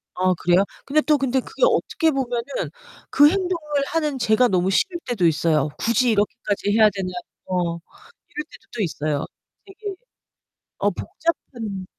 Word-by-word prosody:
아 185 Hz, 0 st, +2 dB
그래요? 180 Hz, +2 st, +4 dB, 0.2 s
근데 305 Hz, +2 st, +3 dB
또 300 Hz, -1 st, +3 dB
근데 265 Hz, -1 st, +1 dB
그게 -, -, -5 dB
어떻게 435 Hz, -8 st, +2 dB
보면은 265 Hz, -, -2 dB, 0.4 s
그 290 Hz, +1 st, +7 dB
행동을 335 Hz, -6 st, -1 dB
하는 300 Hz, -4 st, -1 dB
제가 235 Hz, +1 st, +3 dB
너무 185 Hz, -3 st, +1 dB
싫을 345 Hz, -, +1 dB
때도 225 Hz, -8 st, +1 dB
있어요. 155 Hz, -2 st, +2 dB
'굳이 235 Hz, +2 st, +2 dB
이렇게까지 205 Hz, -1 st, 0 dB
해야 220 Hz, -1 st, +7 dB
되나?' 195 Hz, -3 st, -4 dB, 0.4 s
어 180 Hz, -2 st, -1 dB, 0.5 s
이럴 300 Hz, -, -5 dB
때도 -, -, -16 dB
또 230 Hz, -, -2 dB
있어요. 150 Hz, -4 st, -2 dB, 0.4 s
되게 400 Hz, +1 st, -7 dB, 0.8 s
어 205 Hz, -, +2 dB
복잡한 220 Hz, -, -4 dB
235 Hz, 300 characters per minute, -22 LUFS, 185-300 Hz, 0.8 s, 그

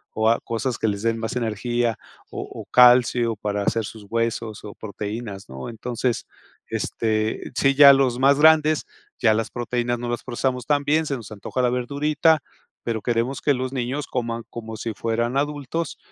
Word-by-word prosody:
o 110 Hz, +1 st, +3 dB
a 115 Hz, -, +3 dB
cosas 115 Hz, +2 st, -2 dB
que 110 Hz, -, +1 dB
les 100 Hz, -1 st, -1 dB
den 115 Hz, 0 st, +1 dB
más 110 Hz, +2 st, -4 dB
energía, 120 Hz, 0 st, -1 dB, 0.3 s
o -, -, -4 dB
o, -, -, -9 dB
calcio 120 Hz, -2 st, +5 dB
para 105 Hz, -1 st, -2 dB
hacer 115 Hz, +2 st, 0 dB
sus 105 Hz, 0 st, -10 dB
huesos, 115 Hz, -2 st, -2 dB
o, 105 Hz, -, -8 dB
proteínas, 105 Hz, -, -6 dB
¿no? 65 Hz, -, -7 dB
Entonces, 120 Hz, +1 st, -3 dB, 0.4 s
este, 110 Hz, -1 st, -2 dB
sí, 135 Hz, 0 st, +3 dB
ya 140 Hz, -1 st, +10 dB
los 130 Hz, -2 st, +2 dB
más 140 Hz, +1 st, +4 dB
grandes 155 Hz, 0 st, +5 dB, 0.3 s
ya 110 Hz, -3 st, +4 dB
las 115 Hz, 0 st, -1 dB
proteínas 120 Hz, 0 st, -2 dB
no 120 Hz, 0 st, -4 dB
las 120 Hz, -, -3 dB
procesamos 125 Hz, 0 st, -2 dB
tan 145 Hz, -1 st, +2 dB
bien, 155 Hz, +2 st, +2 dB
se 140 Hz, -, -2 dB
nos 110 Hz, -2 st, -11 dB
antoja 105 Hz, +5 st, -3 dB
la 125 Hz, -, +3 dB
verdurita, 145 Hz, +5 st, +2 dB, 0.4 s
pero 115 Hz, -2 st, -2 dB
queremos 120 Hz, +3 st, -1 dB
que 145 Hz, -, +3 dB
los 130 Hz, +1 st, -3 dB
niños 130 Hz, +3 st, -3 dB
coman 115 Hz, -2 st, -3 dB
como 110 Hz, -1 st, -7 dB
si 115 Hz, 0 st, -4 dB
fueran 115 Hz, +4 st, -1 dB
adultos, 145 Hz, +2 st, -2 dB
120 Hz, 180 wpm, -23 LUFS, 110-135 Hz, 0.4 s, ya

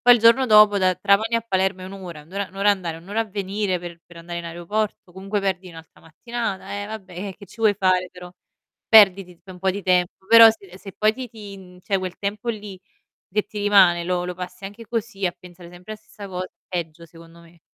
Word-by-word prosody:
Poi, 245 Hz, 0 st, +7 dB
il -, -, +2 dB
giorno 230 Hz, +4 st, +5 dB
dopo 210 Hz, -2 st, +6 dB
da 185 Hz, -1 st, +2 dB
Trapani 200 Hz, +5 st, +2 dB
a 230 Hz, -, -2 dB
Palermo 190 Hz, -3 st, -1 dB
è -, -, -7 dB
1 190 Hz, -, -9 dB
ora, 175 Hz, -6 st, -9 dB
1 160 Hz, +5 st, -21 dB
ora 200 Hz, -1 st, -3 dB
1 190 Hz, -, -22 dB
ora 205 Hz, +1 st, +3 dB
andare, 180 Hz, -5 st, -2 dB
1 165 Hz, +2 st, -15 dB
ora 210 Hz, +3 st, -1 dB
a -, -, 0 dB
venire, 200 Hz, -1 st, -2 dB
per 170 Hz, -1 st, -9 dB
per 175 Hz, -, -16 dB
andare 170 Hz, +1 st, -7 dB
in 170 Hz, -, -7 dB
aeroporto, 180 Hz, +3 st, -4 dB
comunque 195 Hz, +2 st, -3 dB
perdi 190 Hz, -1 st, -2 dB
un'altra 165 Hz, -1 st, -14 dB
mattinata, 210 Hz, +5 st, -5 dB
e -, -, -6 dB
vabbè, 205 Hz, -4 st, -9 dB, 0.2 s
e 190 Hz, -, -8 dB
che -, -, -13 dB
ci 200 Hz, -, -18 dB
vuoi 215 Hz, -2 st, +4 dB
fare 185 Hz, -2 st, +1 dB
però? 180 Hz, -1 st, -12 dB, 0.6 s
Perdi 200 Hz, -3 st, +7 dB
ti 180 Hz, 0 st, -16 dB
tip 170 Hz, -, -35 dB
un 185 Hz, -, -10 dB
po' 190 Hz, +1 st, -1 dB
di 200 Hz, +1 st, -5 dB
tempo, 180 Hz, 0 st, 0 dB
però 230 Hz, 0 st, +9 dB
se 195 Hz, -4 st, -11 dB
se 195 Hz, -1 st, -10 dB
poi 215 Hz, 0 st, +3 dB
ti 255 Hz, +1 st, -7 dB
ti 210 Hz, -3 st, -11 dB
mhmm, 180 Hz, -1 st, -15 dB
cioè 195 Hz, +1 st, -1 dB
quel 185 Hz, -1 st, -5 dB
tempo 205 Hz, +3 st, -4 dB
lì, 205 Hz, -4 st, -5 dB, 0.5 s
che 210 Hz, 0 st, +1 dB
ti 210 Hz, -, -8 dB
rimane, 190 Hz, -4 st, +5 dB
lo 180 Hz, 0 st, -1 dB
lo 180 Hz, -, -4 dB
passi 180 Hz, +1 st, -8 dB
anche 205 Hz, +4 st, -10 dB
così 225 Hz, -3 st, -3 dB
a 175 Hz, -, +1 dB
pensare 175 Hz, -1 st, -15 dB
sempre 180 Hz, +5 st, -10 dB
a -, -, -8 dB
stessa 210 Hz, -1 st, -12 dB
cos 185 Hz, -1 st, -4 dB
è -, -, -37 dB, 0.2 s
peggio, 170 Hz, -2 st, -5 dB
secondo 165 Hz, 0 st, -16 dB
me. 170 Hz, 0 st, -19 dB
190 Hz, 245 wpm, -22 LUFS, 180-210 Hz, 0.6 s, però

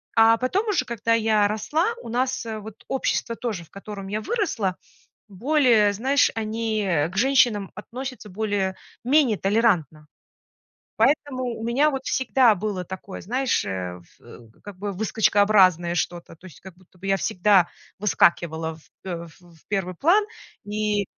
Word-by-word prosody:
а 225 Hz, 0 st, +6 dB
потом 365 Hz, -, -1 dB
уже, 405 Hz, -, +1 dB
когда 230 Hz, 0 st, -1 dB
я 215 Hz, -2 st, +3 dB
росла, 315 Hz, -, 0 dB
у -, -, -8 dB
нас 255 Hz, +2 st, -1 dB
вот 220 Hz, -1 st, -8 dB
общество 255 Hz, -3 st, -1 dB
тоже, 220 Hz, -8 st, -4 dB
в -, -, -27 dB
котором 195 Hz, 0 st, -8 dB
я 210 Hz, +2 st, -3 dB
выросла, 225 Hz, -, -1 dB, 0.5 s
более, 235 Hz, -1 st, +3 dB
знаешь, 265 Hz, +8 st, +2 dB
они 220 Hz, -1 st, -2 dB, 0.3 s
к -, -, -9 dB
женщинам 235 Hz, -6 st, +3 dB
относятся 245 Hz, +1 st, -8 dB
более-менее 215 Hz, +6 st, 0 dB
толерантно. 190 Hz, -, +1 dB, 0.9 s
Поэтому 260 Hz, +2 st, +1 dB
у 235 Hz, -2 st, -4 dB
меня 270 Hz, +6 st, +2 dB
вот 270 Hz, -2 st, -4 dB
всегда 260 Hz, -4 st, +3 dB
было 190 Hz, -1 st, -3 dB
такое, 190 Hz, +2 st, -8 dB
знаешь, 255 Hz, +5 st, 0 dB
э, 90 Hz, -2 st, -5 dB, 0.2 s
в 115 Hz, -1 st, -16 dB
как 205 Hz, -2 st, -10 dB
бы 205 Hz, +1 st, -3 dB
выскочкообразное 195 Hz, -4 st, +3 dB
что-то, 175 Hz, 0 st, -3 dB
то 170 Hz, +3 st, -16 dB
есть 165 Hz, -, -16 dB
как 190 Hz, -2 st, -12 dB
будто 185 Hz, 0 st, -24 dB
бы 190 Hz, -, -8 dB
я 195 Hz, 0 st, +2 dB
всегда 185 Hz, 0 st, +3 dB, 0.3 s
выскакивала, 165 Hz, -5 st, +1 dB
в, 155 Hz, -, -22 dB, 0.2 s
э, 170 Hz, -1 st, -5 dB
в 175 Hz, -2 st, -20 dB
в 160 Hz, -, -26 dB
первый 190 Hz, -3 st, -2 dB
план. 350 Hz, -, +3 dB, 0.4 s
И 210 Hz, 0 st, -1 dB
210 Hz, 145 wpm, -24 LUFS, 185-245 Hz, 0.9 s, а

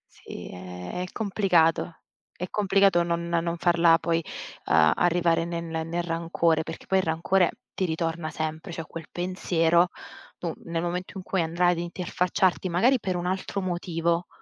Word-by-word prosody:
Sì, -, -, -9 dB
è 90 Hz, -, -6 dB
è -, -, -2 dB
complicato. 180 Hz, -6 st, +1 dB, 0.3 s
È 180 Hz, -, -4 dB
complicato 195 Hz, -3 st, +4 dB
non 170 Hz, 0 st, -1 dB
non 170 Hz, 0 st, 0 dB
farla 170 Hz, -1 st, +5 dB
poi, 165 Hz, 0 st, 0 dB, 0.4 s
uhm, 80 Hz, -1 st, +5 dB
arrivare 170 Hz, -1 st, +2 dB
ne 170 Hz, 0 st, -3 dB
ne 160 Hz, -1 st, -3 dB
nel 170 Hz, +2 st, -2 dB
rancore, 165 Hz, -1 st, +1 dB
perché 160 Hz, +1 st, -8 dB
poi 190 Hz, 0 st, +2 dB
il -, -, +1 dB
rancore 170 Hz, +3 st, +2 dB, 0.2 s
ti 190 Hz, -, -1 dB
ritorna 165 Hz, -1 st, -2 dB
sempre. 160 Hz, +3 st, -4 dB
Cioè, 165 Hz, 0 st, -5 dB
quel 165 Hz, +1 st, -9 dB
pensiero, 175 Hz, -1 st, +2 dB, 0.5 s
tu 170 Hz, -2 st, -3 dB
nel 165 Hz, 0 st, -2 dB
momento 180 Hz, +3 st, -3 dB
in 185 Hz, -, -6 dB
cui 190 Hz, -1 st, 0 dB
andrai 175 Hz, +2 st, +2 dB
ad 170 Hz, -, -1 dB
interfacciarti, 180 Hz, +2 st, 0 dB
magari 235 Hz, +10 st, +3 dB
per 185 Hz, -3 st, -2 dB
un 175 Hz, -, -3 dB
altro 190 Hz, +2 st, -2 dB
motivo, 170 Hz, -1 st, -1 dB
170 Hz, 160 wpm, -26 LUFS, 165-180 Hz, 0.5 s, farla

